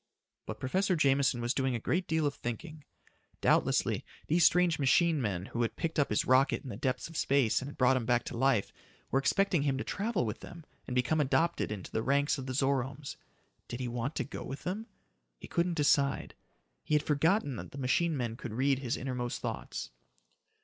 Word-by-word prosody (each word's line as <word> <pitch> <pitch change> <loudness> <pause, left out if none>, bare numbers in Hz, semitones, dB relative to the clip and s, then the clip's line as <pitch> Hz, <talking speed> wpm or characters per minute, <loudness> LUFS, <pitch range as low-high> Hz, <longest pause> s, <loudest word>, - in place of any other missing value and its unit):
But - - -6
Professor 185 +8 +1
Jameson 135 -4 +2
was 120 +2 0
doing 130 -2 0
a - - -2
great 175 - -1
deal 160 -1 +1
of 145 - +1
thinking. 150 +7 -6 0.6
Doubtlessly, - - +2 0.2
these 170 +2 +3
strange 175 -2 +4
machine 150 +3 +3
men 95 -6 -2
who 120 - -1
had 115 - -1
picked 165 -1 -2
up 140 - +2
his 105 - +1
rocket 130 +2 +3
in 130 - -7
the 115 - -5
depths 130 +3 -2
of 165 - -13
space 135 -6 +2
and 135 - -5
had - - -11
brought 130 +1 +4
him 115 -3 -3
back 120 -1 +2
to - - -6
life, 125 -4 +2 0.4
were 135 - +3
expecting 180 +3 +2
him 140 -2 0
to - - -2
travel 200 - -1
with 105 - -4
them 170 -3 -11 0.2
and 125 - -4
become 125 +5 +2
adopted 165 0 +1
into 100 -4 -6
the 110 - -1
ranks 140 +3 +1
of 130 - -6
the 130 - -3
Zoromes. 135 +1 -1 0.5
Did 120 - -6
he 125 - -2
want 120 +5 -3
to - - 0
go - - -7
with 135 - -7
them? 205 +5 -4 0.5
He - - -10
couldn't 170 0 0
decide. 145 -2 +2 0.5
He 150 - +1
had 150 - +2
forgotten 150 - +1
that - - -7
the - - -11
machine 145 +5 +1
men 115 -3 -3
could 120 -4 -6
read 135 +3 +2
his 130 -1 -2
innermost 125 -2 -3
thoughts. - - -5
135 Hz, 205 wpm, -31 LUFS, 125-155 Hz, 0.6 s, strange